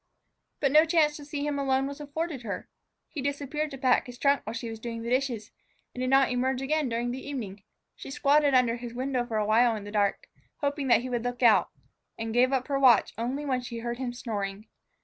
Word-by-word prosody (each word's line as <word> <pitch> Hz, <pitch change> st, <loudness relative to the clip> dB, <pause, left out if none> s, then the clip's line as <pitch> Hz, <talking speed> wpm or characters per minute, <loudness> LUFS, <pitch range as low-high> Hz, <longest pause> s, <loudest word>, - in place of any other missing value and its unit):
But 275 Hz, -, +2 dB
no 305 Hz, +2 st, +7 dB
chance 320 Hz, -3 st, +2 dB
to 290 Hz, -, -10 dB
see 290 Hz, 0 st, -4 dB
him 290 Hz, -1 st, -1 dB
alone 270 Hz, -1 st, +1 dB
was 280 Hz, +1 st, -6 dB
afforded 295 Hz, -1 st, -4 dB
her. 220 Hz, -4 st, -5 dB, 0.4 s
He 290 Hz, -, -6 dB
disappeared 285 Hz, +2 st, -2 dB
to 275 Hz, -, -8 dB
pack 255 Hz, -1 st, +2 dB
his 245 Hz, 0 st, -9 dB
trunk 280 Hz, +2 st, +2 dB
while 220 Hz, -, -4 dB
she 235 Hz, 0 st, -4 dB
was 225 Hz, -1 st, -7 dB
doing 230 Hz, 0 st, -5 dB
the 235 Hz, -, -4 dB
dishes, 250 Hz, -5 st, -1 dB, 0.4 s
and 250 Hz, -, -6 dB
did 255 Hz, -, 0 dB
not 270 Hz, 0 st, +4 dB
emerge 255 Hz, +1 st, 0 dB
again 290 Hz, +1 st, 0 dB
during 240 Hz, +1 st, -1 dB
the 260 Hz, +2 st, -5 dB
evening. 215 Hz, -9 st, -6 dB, 0.3 s
She -, -, -10 dB
squatted 285 Hz, 0 st, +3 dB
under 245 Hz, -2 st, +3 dB
his 240 Hz, 0 st, -8 dB
window 255 Hz, -1 st, -1 dB
for 225 Hz, -3 st, -2 dB
a 210 Hz, -, +1 dB
while 225 Hz, +2 st, +4 dB
in 210 Hz, -, -6 dB
the 205 Hz, -, -8 dB
dark, 205 Hz, -2 st, 0 dB, 0.4 s
hoping 285 Hz, -1 st, -1 dB
that 240 Hz, -, +5 dB
he 255 Hz, -, -5 dB
would 240 Hz, -2 st, -1 dB
look 245 Hz, 0 st, -3 dB
out, 225 Hz, -3 st, +5 dB, 0.5 s
and 225 Hz, 0 st, -4 dB
gave 250 Hz, +2 st, +4 dB
up 260 Hz, -2 st, 0 dB
her 275 Hz, -2 st, 0 dB
watch 250 Hz, -6 st, +5 dB
only 255 Hz, +6 st, -3 dB
when 260 Hz, -3 st, 0 dB
she 240 Hz, -1 st, -7 dB
heard 235 Hz, +1 st, -4 dB
him 255 Hz, -2 st, -2 dB
snoring. 210 Hz, -4 st, -4 dB
255 Hz, 230 wpm, -28 LUFS, 235-280 Hz, 0.5 s, no